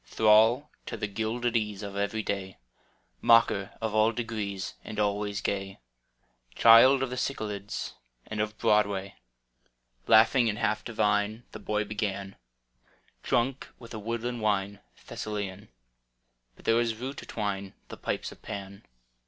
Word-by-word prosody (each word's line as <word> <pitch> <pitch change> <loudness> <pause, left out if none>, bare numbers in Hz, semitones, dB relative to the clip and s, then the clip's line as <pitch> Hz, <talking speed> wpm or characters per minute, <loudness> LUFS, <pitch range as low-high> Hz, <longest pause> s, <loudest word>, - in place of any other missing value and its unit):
Thrall 110 - +4 0.2
to - - -4
the - - -2
gilded 115 +3 -2
ease 105 -2 -1
Of 100 -1 -6
every 100 +2 -1
day. 95 -2 -4 0.6
Mocker 115 -4 +4
of 110 -2 -2
all 110 +1 +4
d^rees 110 -5 -4
And 110 -1 -6
always 105 0 0
gay. 95 -1 -3 0.8
Child 130 +4 +7
of 130 - -3
the 125 - -4
Cyclades 105 -6 -3 0.3
And 105 -1 -3
of 105 0 -3
Broadway 100 -3 +1 0.4
— - - -43
[106| - - -13
Laughing 115 +2 +6
and 105 - -2
half 110 0 0
divine 105 0 0
The - - -8
boy 105 0 -1
began, 100 -2 -3 0.9
Drunk 125 +3 0
with 115 -1 -12
a 110 - -5
woodland 115 +2 -3
wine 100 -1 0 0.3
Thessalian: 100 -1 -5 0.9
But - - -19
there 115 - +4
was 115 -1 +1
rue 130 +4 -5
to - - -9
twine 100 -3 -3
The - - -8
pipes - - -3
of - - -15
Pan. 100 +1 -7
105 Hz, 145 wpm, -28 LUFS, 100-115 Hz, 0.9 s, Child